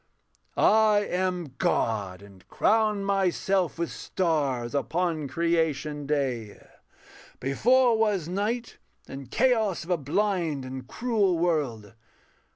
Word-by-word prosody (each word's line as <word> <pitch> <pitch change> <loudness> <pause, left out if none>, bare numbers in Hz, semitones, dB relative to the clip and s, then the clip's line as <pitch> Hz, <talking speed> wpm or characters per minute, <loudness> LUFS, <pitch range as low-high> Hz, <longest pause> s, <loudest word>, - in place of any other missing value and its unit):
I 215 -1 +4
am 180 -5 -2
God, 100 -4 -1
and 100 -2 -17
crown 215 -2 +1
myself 195 -2 0
with 170 0 -2
stars. 140 -9 -1
Upon 160 +1 -1
creation 155 -2 -1
day: 130 -8 -2 0.8
before 240 - +3
was 210 -7 +1
night 215 +6 -3 0.3
And 135 -2 -9
chaos 220 - +1
of 175 - -6
a 175 - +3
blind 160 -2 -1
and 130 -1 -7
cruel 215 - 0
world. 140 - -1
170 Hz, 105 wpm, -26 LUFS, 135-200 Hz, 0.8 s, I